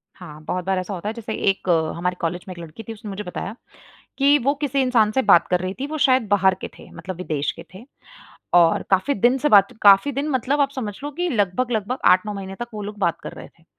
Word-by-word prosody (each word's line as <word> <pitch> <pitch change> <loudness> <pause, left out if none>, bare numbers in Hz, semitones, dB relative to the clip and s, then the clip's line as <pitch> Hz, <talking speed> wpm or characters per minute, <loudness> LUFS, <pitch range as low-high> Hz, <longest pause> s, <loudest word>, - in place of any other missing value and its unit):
हाँ, 155 -5 -11
बहुत 180 +3 -3
बार 190 -1 0
ऐसा 185 +2 -5
होता 190 +3 -4
है, - - -4
जैसे 225 -1 -6 0.2
एक 195 -1 -2 0.3
हमारे 180 +1 -2
कॉलेज 175 +1 -3
में 185 - -6
एक - - -12
लड़की 165 +5 -10
थी, 225 - -7
उसने 215 -1 -10
मुझे 200 +1 -5
बताया 195 +2 -6 0.6
कि 285 +1 +5
वो 280 +2 +2
किसी 280 -1 0
इंसान 240 -5 +3
से 265 - +1
बात 195 -6 +5
कर 180 -1 +1
रही 185 +1 -4
थी। 275 - -2
वो 310 +1 -5
शायद 255 -3 +3
बाहर 190 -2 +3
के - - -5
थे, - - -14
मतलब 185 -2 -8
विदेश 155 -5 -2
के 165 - -11
थे। 195 +5 -11 0.7
और 170 -1 +4
काफ़ी 195 +9 +2
दिन 240 +6 +3
से 295 - +1
बात 200 -4 +5
काफ़ी 200 +7 +6
दिन 280 +3 -2
मतलब 265 +2 0
आप 275 -1 +2
समझ 215 -6 -4
लो 290 - -4
कि 350 +5 -2
लगभग-लगभग 230 - -1
8-9 185 +3 +1
महीने 195 -1 -7
तक 240 - -4
वो 210 - -5
लोग 205 +1 -7
बात 170 -4 0
कर - - -7
रहे - - -11
थे। 165 - -27
205 Hz, 250 wpm, -22 LUFS, 185-255 Hz, 0.7 s, काफ़ी